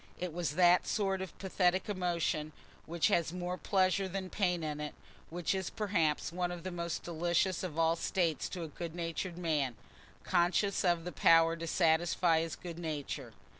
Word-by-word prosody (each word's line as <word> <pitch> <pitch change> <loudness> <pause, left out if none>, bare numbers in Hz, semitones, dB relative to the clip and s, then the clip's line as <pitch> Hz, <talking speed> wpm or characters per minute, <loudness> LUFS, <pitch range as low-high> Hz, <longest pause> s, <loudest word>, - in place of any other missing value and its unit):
It 180 -2 -4
was 170 -3 -2
that 180 0 +5
sort 195 -3 0
of 190 -3 -7
pathetic 185 0 +1
emotion 170 -5 -1 0.3
which 170 0 +1
has 170 -2 +2
more 180 0 -3
pleasure 190 0 +1
than 190 0 -5
pain 180 -4 0
in 150 -1 -3
it—which 160 +3 -5
is 190 -1 -2
perhaps 170 -9 0
one 175 0 -1
of 175 -2 -7
the 185 - -4
most 170 -1 -3
delicious 175 +2 0
of 175 -4 -5
all 165 0 +3
states 170 -2 0
to 180 -3 -5
a - - -4
good 165 +2 -7
natured 170 +1 -3
man, 150 -8 0 0.5
conscious 185 +3 +2
of 175 -2 +2
the 180 - -5
power 165 +3 +5
to 165 0 -6
satisfy 165 0 +3
his 165 -1 -3
good 170 -1 -8
nature. 145 -6 -4
175 Hz, 170 wpm, -33 LUFS, 165-185 Hz, 0.5 s, that